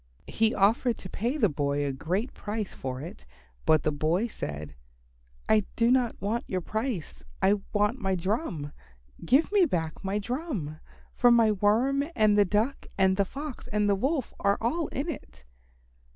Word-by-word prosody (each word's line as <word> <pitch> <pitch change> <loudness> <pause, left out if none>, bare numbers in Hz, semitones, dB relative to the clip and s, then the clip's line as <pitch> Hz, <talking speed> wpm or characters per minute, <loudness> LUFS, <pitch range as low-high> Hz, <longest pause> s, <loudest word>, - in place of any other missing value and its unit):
He 225 0 +1
offered 225 +4 +3
to 185 - -9
pay 240 +8 -1
the 230 -8 +4
boy 145 -2 -1
a 140 - 0
great 185 - -2
price 210 -1 -4
for 130 0 -5
it, 155 - -9 0.4
but 155 -2 +5
the 155 - +1
boy 155 +8 +1
said, 75 - -6 0.7
"I 215 -2 +4
do 235 +1 +3
not 250 -3 +2
want 215 +5 -2
your 185 - 0
price. 210 - -4 0.2
I 200 +1 +3
want 210 +4 +1
my 190 0 +1
drum. 180 - -2 0.5
Give 270 - +3
me 405 -3 +5
back 160 - -3
my 195 +1 -1
drum, 210 - -4 0.3
for 245 - +4
my 230 -2 +5
Worm 225 +8 +2
and 215 -2 +4
the 205 -1 +5
Duck 215 +8 0
and 190 -1 +4
the 200 0 +2
Fox 280 +5 -7
and 210 0 +1
the 200 - +4
Wolf 265 +6 -1
are 200 0 +2
all 305 +8 0
in 275 +5 -4
it." 275 - -7
210 Hz, 170 wpm, -28 LUFS, 175-240 Hz, 0.7 s, but